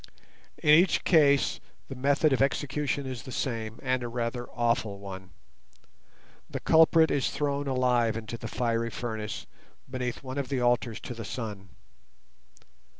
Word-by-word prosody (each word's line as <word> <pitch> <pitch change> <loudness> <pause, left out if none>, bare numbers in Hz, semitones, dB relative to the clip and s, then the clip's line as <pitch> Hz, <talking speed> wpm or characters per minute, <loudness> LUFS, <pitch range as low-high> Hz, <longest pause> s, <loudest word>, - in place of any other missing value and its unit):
In 150 - +3
each 175 +5 +5
case 145 -5 +4 0.3
the - - -6
method 140 +3 +2
of 130 - +1
execution 140 0 0
is 130 -3 -5
the 130 - -9
same, 115 -4 -3
and 130 -1 0
a 120 - -3
rather 120 +1 -3
awful 115 -4 0
one. 95 -1 -9 1.2
The - - -4
culprit 160 0 +5
is 140 - +1
thrown 145 -1 -2
alive 125 -4 +2
into 115 0 -6
the 115 - -6
fiery 115 0 -1
furnace 110 -2 -5 0.4
beneath 125 -1 -4
one 130 +1 -4
of 135 - -3
the 135 -2 0
altars 120 -2 +1
to - - -6
the 115 -1 -7
Sun. 100 -3 -6
125 Hz, 150 wpm, -28 LUFS, 115-140 Hz, 1.2 s, each